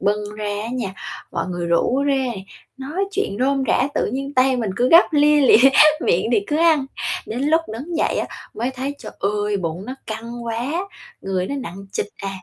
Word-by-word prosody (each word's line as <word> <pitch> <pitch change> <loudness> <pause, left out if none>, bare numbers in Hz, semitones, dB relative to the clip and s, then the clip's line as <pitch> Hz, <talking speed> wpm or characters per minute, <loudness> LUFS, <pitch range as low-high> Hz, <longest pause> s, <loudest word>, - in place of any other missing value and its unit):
bưng 205 +1 -1
ra 215 - -5 0.2
á 225 - -5
nha, 250 -5 -2 0.4
mọi 170 -1 -2
người 175 -1 -3
rủ 205 +11 +2
rê, 265 -3 +1 0.4
nói 295 +9 -3
chuyện 395 - -2
rôm 275 +1 +2
rả 255 - +2
tự - - +1
nhiên 275 +2 -4
tay 255 0 +3
mình 225 -5 -2
cứ 250 +1 +2
gắp 335 +2 +6
lia 295 0 +5
lịa, 265 -1 +7 0.3
miệng 465 +7 +1
thì 425 - +4
cứ 295 - 0
ăn. 315 -4 +3 0.4
Đến 235 +3 -4
lúc 320 +3 +3
đứng 300 +9 -5
dậy - - +1
á, - - -1 0.3
mới 240 +3 -2
thấy, 265 +2 -4
trời - - -9
ơi, 205 +1 0
bụng 175 0 -4
nó 255 - -5
căng 235 +2 -6
quá! 235 +4 -3 0.5
Người 185 -1 -2
nó 280 - -4
nặng 195 0 -8
trịch - - -1 0.2
à, 195 - -2
250 Hz, 205 wpm, -21 LUFS, 210-280 Hz, 0.5 s, lịa